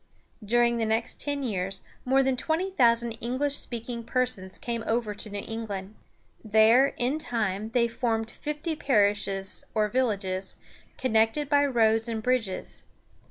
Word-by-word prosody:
During 235 Hz, +2 st, +3 dB
the 225 Hz, -, 0 dB
next 225 Hz, +1 st, -1 dB
ten 285 Hz, -1 st, -1 dB
years, 195 Hz, -5 st, -2 dB, 0.2 s
more 270 Hz, +1 st, +4 dB
than 265 Hz, -1 st, +1 dB
twenty 325 Hz, +8 st, -1 dB
thousand 235 Hz, -7 st, +3 dB
English 265 Hz, +4 st, -1 dB
speaking 235 Hz, 0 st, -5 dB
persons 230 Hz, -6 st, -2 dB
came 235 Hz, -2 st, -3 dB
over 225 Hz, -2 st, 0 dB
to 210 Hz, +1 st, -4 dB
New 205 Hz, 0 st, -5 dB
England. 210 Hz, -3 st, -5 dB, 0.5 s
There, 220 Hz, +5 st, +5 dB
in 255 Hz, +5 st, 0 dB
time, 220 Hz, -6 st, -2 dB
they 235 Hz, 0 st, +2 dB
formed 225 Hz, -1 st, -1 dB
fifty 300 Hz, +4 st, -4 dB
parishes, 205 Hz, -7 st, +1 dB
or 215 Hz, -1 st, +2 dB
villages, 200 Hz, -6 st, -1 dB, 0.4 s
connected 225 Hz, +4 st, +1 dB
by 285 Hz, -1 st, +4 dB
roads 225 Hz, -3 st, +2 dB
and 220 Hz, -1 st, -3 dB
bridges. 235 Hz, -6 st, -1 dB
230 Hz, 140 wpm, -27 LUFS, 215-255 Hz, 0.5 s, There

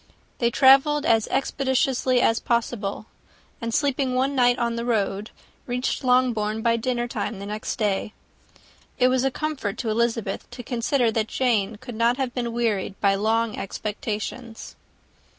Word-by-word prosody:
They 235 Hz, -, +3 dB
travelled 275 Hz, +4 st, +5 dB
as 225 Hz, -6 st, +3 dB
expeditiously 265 Hz, -2 st, +1 dB
as 225 Hz, -, +3 dB
possible; 225 Hz, -4 st, -2 dB, 0.6 s
and 230 Hz, 0 st, -3 dB
sleeping 270 Hz, -1 st, 0 dB
one 265 Hz, +2 st, +1 dB
night 245 Hz, -2 st, +3 dB
on 235 Hz, -1 st, -1 dB
the 235 Hz, -, -3 dB
road, 210 Hz, -3 st, -1 dB, 0.4 s
reached 250 Hz, +2 st, -2 dB
Longbourn 230 Hz, -4 st, +2 dB
by 230 Hz, 0 st, +3 dB
dinnertime 240 Hz, -3 st, -2 dB
the 200 Hz, -, -7 dB
next 210 Hz, +1 st, -4 dB
day. 210 Hz, -1 st, -1 dB, 0.9 s
It 255 Hz, -1 st, +4 dB
was 255 Hz, 0 st, +2 dB
a 270 Hz, -, +3 dB
comfort 270 Hz, -7 st, -3 dB
to 235 Hz, -, -3 dB
Elizabeth 230 Hz, -3 st, -1 dB
to 245 Hz, 0 st, -9 dB
consider 240 Hz, 0 st, +1 dB
that 220 Hz, 0 st, 0 dB
Jane 225 Hz, -5 st, 0 dB
could 245 Hz, +3 st, -9 dB
not 230 Hz, +2 st, +2 dB
have 260 Hz, -3 st, -2 dB
been 240 Hz, -2 st, -2 dB
wearied 215 Hz, -5 st, -1 dB
by 200 Hz, -1 st, +3 dB
long 220 Hz, +2 st, +1 dB
expectations. 215 Hz, +3 st, -5 dB
235 Hz, 150 wpm, -24 LUFS, 215-255 Hz, 0.9 s, travelled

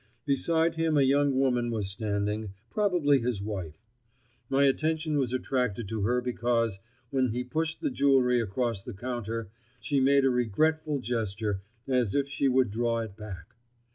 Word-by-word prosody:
Beside 160 Hz, +4 st, +2 dB
him 160 Hz, -2 st, +2 dB
a 140 Hz, -, +5 dB
young 140 Hz, 0 st, +3 dB
woman 125 Hz, -3 st, +2 dB
was 105 Hz, -4 st, -2 dB
standing—probably 110 Hz, -, 0 dB
his 120 Hz, -3 st, -1 dB
wife. 95 Hz, -7 st, -5 dB, 0.7 s
My 135 Hz, +1 st, +3 dB
attention 155 Hz, +3 st, +1 dB
was 130 Hz, -3 st, 0 dB
attracted 125 Hz, -4 st, -1 dB
to 110 Hz, -2 st, -2 dB
her 120 Hz, +5 st, +1 dB
because, 120 Hz, -4 st, 0 dB, 0.3 s
when 130 Hz, -1 st, +2 dB
he 120 Hz, +2 st, -2 dB
pushed 160 Hz, +5 st, -2 dB
the -, -, 0 dB
jewelry 130 Hz, -2 st, +3 dB
across 115 Hz, 0 st, -1 dB
the 100 Hz, -, -8 dB
counter, 115 Hz, -2 st, -4 dB, 0.3 s
she 140 Hz, -2 st, 0 dB
made 135 Hz, +1 st, +4 dB
a 135 Hz, -, +4 dB
regretful 150 Hz, +5 st, +1 dB
gesture, 110 Hz, -4 st, -2 dB, 0.3 s
as 125 Hz, -6 st, +1 dB
if 140 Hz, -1 st, +1 dB
she 140 Hz, 0 st, 0 dB
would 130 Hz, -4 st, +3 dB
draw 115 Hz, +1 st, 0 dB
it 110 Hz, -3 st, -7 dB
back. 100 Hz, -6 st, -9 dB
125 Hz, 155 wpm, -28 LUFS, 110-140 Hz, 0.7 s, a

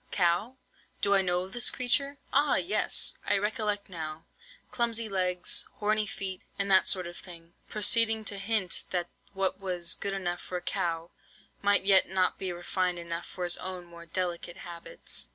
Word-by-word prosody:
cow? 180 Hz, +7 st, +1 dB, 0.5 s
do 200 Hz, -, +4 dB
I 195 Hz, -, +5 dB
know 180 Hz, 0 st, 0 dB
the 240 Hz, +5 st, +3 dB
creature? 275 Hz, +3 st, +1 dB, 0.2 s
Ah! 285 Hz, +1 st, +4 dB
Yes, 370 Hz, -, +2 dB
I 205 Hz, -, +3 dB
recollect 210 Hz, 0 st, -1 dB
now; 160 Hz, -2 st, -6 dB, 0.5 s
clumsy 230 Hz, -1 st, 0 dB
legs, 180 Hz, -3 st, 0 dB
horny 215 Hz, 0 st, +1 dB
feet, 190 Hz, -2 st, -4 dB, 0.2 s
and 200 Hz, 0 st, 0 dB
that 190 Hz, 0 st, +6 dB
sort 185 Hz, -2 st, +2 dB
of 175 Hz, 0 st, -8 dB
thing,' 170 Hz, -2 st, -12 dB, 0.2 s
proceeding 220 Hz, +1 st, +4 dB
to 200 Hz, -1 st, -1 dB
hint 195 Hz, -3 st, 0 dB
that 175 Hz, -2 st, -1 dB, 0.3 s
what 190 Hz, 0 st, 0 dB
was 180 Hz, -3 st, 0 dB
good 200 Hz, -, -3 dB
enough 175 Hz, -2 st, -2 dB
for 180 Hz, -, -4 dB
a -, -, -5 dB
cow, 165 Hz, 0 st, -2 dB, 0.5 s
might 205 Hz, -1 st, +3 dB
yet 195 Hz, -2 st, +5 dB
not 185 Hz, -1 st, +1 dB
be 190 Hz, -2 st, -2 dB
refined 175 Hz, +1 st, -1 dB
enough 170 Hz, 0 st, -5 dB
for 180 Hz, -, -6 dB
his 175 Hz, 0 st, +2 dB
own 185 Hz, -1 st, -6 dB
more 170 Hz, -1 st, -12 dB
delicate 175 Hz, 0 st, -3 dB
habits. 170 Hz, -, -4 dB
185 Hz, 170 wpm, -29 LUFS, 175-205 Hz, 0.5 s, that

